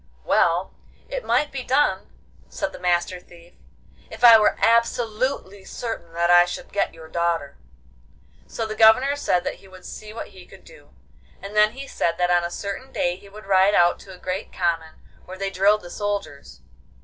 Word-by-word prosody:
'Well, - - +1 0.4
it - - -4
might 295 - +1
be 270 - -5
done,' 270 +4 +1 0.4
said - - -4
the - - -10
Master 180 0 0
Thief, 175 -1 -18 0.6
'if 220 +2 -11
I 235 -2 +10
were 210 - +3
absolutely 230 -2 0
certain 225 -9 -6
that 170 +1 +1
I 175 0 +8
should 175 - -8
get 200 - 0
your 160 -1 -12
daughter.' 165 -4 -2 0.9
So 225 - -4
the 215 - -4
Governor 230 +6 +5
said 180 -11 0
that - - -4
he 195 - -17
would 185 -1 -15
see 215 0 -9
what 225 - -8
he - - -15
could - - -17
do, - - -17 0.5
and 200 +2 -9
then 210 +1 +4
he 275 +2 -8
said 170 -9 -1
that 180 0 +1
on 175 0 +3
a 170 - -2
certain 200 +8 -6
day 175 0 -1
he 200 +2 -16
would 210 +1 -13
ride 195 +1 +4
out 175 0 +3
to 195 - -13
a - - -16
great 185 +2 -5
common 165 -3 -2 0.3
where 185 +1 -9
they 195 0 -3
drilled 200 +3 +3
the 175 - -10
soldiers. 205 -8 -5
195 Hz, 190 wpm, -23 LUFS, 175-225 Hz, 0.9 s, I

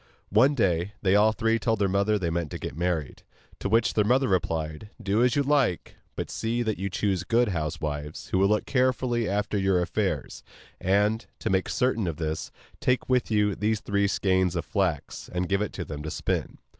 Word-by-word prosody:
One 130 +8 +5
day 90 -4 +1
they 95 0 +4
all 105 +1 +5
three 115 0 +1
told 115 -1 +1
their 100 -1 +2
mother 100 +3 +2
they 85 -4 -2
meant 85 -2 -2
to - - -5
get - - -6
married. 85 -4 -2 0.4
To - - -2
which 115 +1 +3
their 105 - +3
mother 130 +5 +3
replied: 80 -1 -1
'Do 105 +1 +1
as 125 0 +3
you 145 - +2
like, 135 - +1 0.2
but - - -4
see 115 +2 -1
that 110 -5 -2
you 100 +1 -2
choose 95 -1 -1
good 120 0 +2
housewives, 75 -3 -4
who 95 - +1
will 100 - +5
look 105 +1 +1
carefully 125 -3 +1
after 105 +1 0
your 95 -1 +2
affairs; 90 -4 -2 0.4
and, 105 +4 +1
to 110 - -2
make 95 -1 +1
certain 125 -6 +1
of 80 -3 -3
this, 80 -1 -3 0.3
take 125 0 +1
with 125 -2 +2
you 105 -2 +2
these 105 +2 0
three 100 0 0
skeins 95 -2 +1
of 85 - -2
flax, 95 -8 -2
and 90 0 -1
give 100 +2 +1
it 105 - -2
to 90 - -5
them 75 -2 -6
to 80 - -5
spin. - - -2
100 Hz, 205 wpm, -26 LUFS, 90-115 Hz, 0.4 s, One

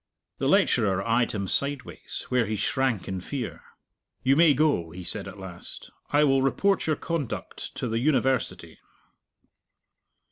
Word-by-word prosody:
The - - 0
lecturer 95 0 +3
eyed 115 +1 +2
him 100 -3 -3
sideways 140 +5 -2
where 125 -3 +2
he 110 - -1
shrank 115 -1 0
in 95 -1 -3
fear. 125 +3 -5 0.6
"You 135 +1 +4
may 160 -2 +6
go," 140 - +2
he 90 +3 -9
said 95 +3 -3
at 95 - -9
last. 90 -3 -10 0.2
"I 145 +1 +4
will 135 -2 +4
report 195 +9 +1
your 155 - +2
conduct 160 -5 -4
to - - -3
the 115 0 -1
University." 130 -2 0
125 Hz, 145 wpm, -26 LUFS, 100-140 Hz, 0.6 s, may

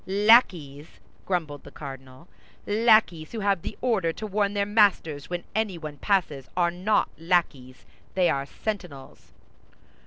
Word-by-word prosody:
"Lackeys?" 185 - +2 0.3
grumbled 160 -6 -3
the - - -12
cardinal. 135 +1 -11 0.4
"Lackeys 210 -7 +2
who 225 - -4
have 200 -3 +1
the - - -7
order 215 -10 +1
to 215 - -7
warn 205 0 -1
their 200 0 +1
masters 200 -9 +1
when 175 -1 -4
anyone 170 -9 -3
passes 155 -7 -1
are 170 -1 +2
not 185 +5 0
lackeys, 155 -7 -1 0.3
they 185 -2 +3
are 140 -3 -1
sentinels." 180 -9 -7
175 Hz, 130 wpm, -25 LUFS, 145-205 Hz, 0.4 s, they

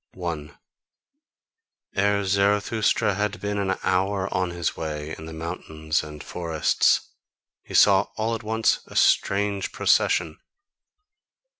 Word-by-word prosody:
1. 85 -5 -5 1.4
Ere 100 +1 +2
Zarathustra 100 +2 +2
had 105 +2 -2
been 105 0 -2
an 95 -1 0
hour 95 +1 +1
on 90 -1 0
his 85 -1 -2
way 75 -1 -5
in 80 - -10
the - - -8
mountains 80 -1 -3
and 75 -1 -9
forests, 85 -3 +1 0.5
he - - -9
saw 100 -1 +6
all 110 +1 0
at 115 - -3
once 110 0 +1
a - - -13
strange 100 0 +2
procession. 80 -3 +1
95 Hz, 120 wpm, -24 LUFS, 80-100 Hz, 1.4 s, saw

